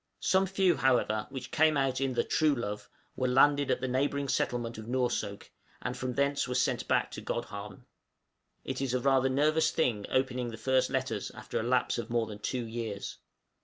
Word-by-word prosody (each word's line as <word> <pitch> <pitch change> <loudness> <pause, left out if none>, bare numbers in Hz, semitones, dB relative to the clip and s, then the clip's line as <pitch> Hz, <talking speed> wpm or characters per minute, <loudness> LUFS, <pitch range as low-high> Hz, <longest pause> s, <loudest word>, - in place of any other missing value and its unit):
Some 190 0 +3
few, 190 -2 +2
however, 120 -5 +2
which 135 -2 -7
came 155 -1 +4
out 135 -1 0
in 135 -2 0
the - - +2
'Truelove,' 120 -10 0 0.3
were 130 - 0
landed 140 +2 +4
at - - +1
the 130 - -1
neighboring 140 +2 0
settlement 120 -3 -1
of 110 - -9
Noursoak, 120 -5 -2 0.3
and 125 - -4
from 125 -1 -3
thence 140 0 +1
were 125 - -3
sent - - +1
back - - +1
to - - -7
Godhavn. 105 -4 -5 0.8
It 130 0 -3
is 130 -2 0
rather 130 +1 +3
a - - 0
nervous 155 +4 +3
thing 115 -10 0
opening 130 -1 0
the 115 - -7
first 130 +2 +2
letters - - -2
after - - -5
a - - -2
lapse 125 0 +1
of 115 - -5
more 115 -1 +1
than 105 -2 -8
two 120 +3 -2
years. 110 -3 -5
130 Hz, 190 wpm, -30 LUFS, 120-140 Hz, 0.8 s, came